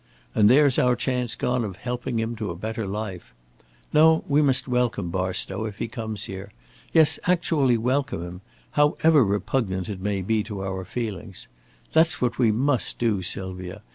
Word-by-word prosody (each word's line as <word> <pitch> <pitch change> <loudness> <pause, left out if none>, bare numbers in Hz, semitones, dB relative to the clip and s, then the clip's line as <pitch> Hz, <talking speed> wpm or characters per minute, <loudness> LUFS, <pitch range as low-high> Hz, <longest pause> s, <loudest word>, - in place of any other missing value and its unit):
And 105 -1 +5
there's 140 +1 +5
our 125 0 +3
chance 125 -1 -1
gone 125 -1 0
of 100 -4 -5
helping 125 +1 -4
him 115 +1 -2
to 105 -2 -3
a 85 - -4
better 110 +3 -4
life. 95 - -6 0.6
No, 160 +1 +5
we 145 +1 +3
must 130 -3 +2
welcome 125 -8 0
Barstow, 95 +3 -2
if 105 -2 -6
he - - -3
comes 110 -2 -5
here. 95 +1 -7 0.4
Yes, 160 -2 +4
actually 160 -8 +2
welcome 125 -5 -1
him, 90 +1 -8 0.3
however 150 0 +4
repugnant 100 -1 -1
it 95 -3 -5
may 100 -1 -1
be 110 +3 +1
to 105 -3 -5
our 95 -1 -4
feelings. 105 -3 -6 0.5
That's 160 +1 +3
what 120 -1 -1
we 115 -4 +4
must 130 +1 0
do, 110 -5 +1
Sylvia. 95 +2 -4
110 Hz, 170 wpm, -24 LUFS, 95-125 Hz, 0.6 s, And